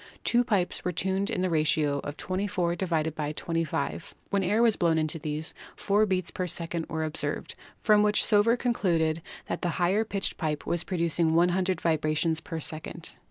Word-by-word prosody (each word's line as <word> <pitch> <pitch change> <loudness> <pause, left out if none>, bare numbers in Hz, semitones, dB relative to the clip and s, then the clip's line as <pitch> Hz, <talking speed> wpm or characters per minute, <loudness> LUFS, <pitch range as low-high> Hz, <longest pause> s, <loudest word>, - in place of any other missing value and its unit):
Two 240 +1 +3
pipes 200 -7 0
were 180 - 0
tuned 190 +3 -1
in 185 -5 -1
the 185 - +1
ratio 155 -2 +2
of 145 +1 -6
24 185 -2 -1
^25. 160 -2 -2 0.2
When 200 -1 +2
air 210 +5 +2
was 225 -3 +4
blown 165 -2 +2
into 155 +1 0
these 155 +1 -3 0.2
four 210 +2 +2
beats 185 -3 0
per 185 - -3
second 170 -1 -3
were 160 -1 -2
observed, 155 -1 -2 0.3
from 210 -1 +5
which 210 0 +4
Sauveur 215 +3 +4
concluded 170 -10 +1 0.2
that - - -4
the 175 - 0
higher 190 +5 +2
pitched 200 -3 -2
pipe 155 -3 -2
was 170 -1 +1
producing 170 -2 +1
100 180 +2 +2
vibrations 160 0 +1
per 165 - -5
second. 155 0 -5
175 Hz, 165 wpm, -28 LUFS, 160-195 Hz, 0.3 s, from